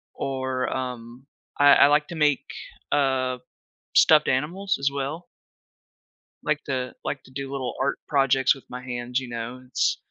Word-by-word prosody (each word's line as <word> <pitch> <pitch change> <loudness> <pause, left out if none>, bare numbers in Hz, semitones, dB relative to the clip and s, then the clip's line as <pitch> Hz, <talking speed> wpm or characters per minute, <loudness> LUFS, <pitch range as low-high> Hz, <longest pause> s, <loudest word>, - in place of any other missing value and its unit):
Or, 130 -1 -2
um, 125 0 -6 0.3
I 145 0 +7
I - - +7
like 150 +1 +3
to 170 - -6
make, 150 -3 +2 0.5
uh, 130 -3 +1 0.6
stuffed 155 -1 +6
animals 180 +9 0
as 140 0 +2
well. 140 +5 -4 1.2
Like 150 0 -1
to 130 -2 -3
like 135 - -4
to - - -18
do 135 +1 -6
little 135 -3 -3
art 140 +1 0
projects 135 -2 +3
with 135 - -14
my 125 0 -7
hands, 125 0 -2
you 130 -2 -8
know? 120 +2 -6
It's 125 - +1
135 Hz, 155 wpm, -25 LUFS, 125-145 Hz, 1.2 s, I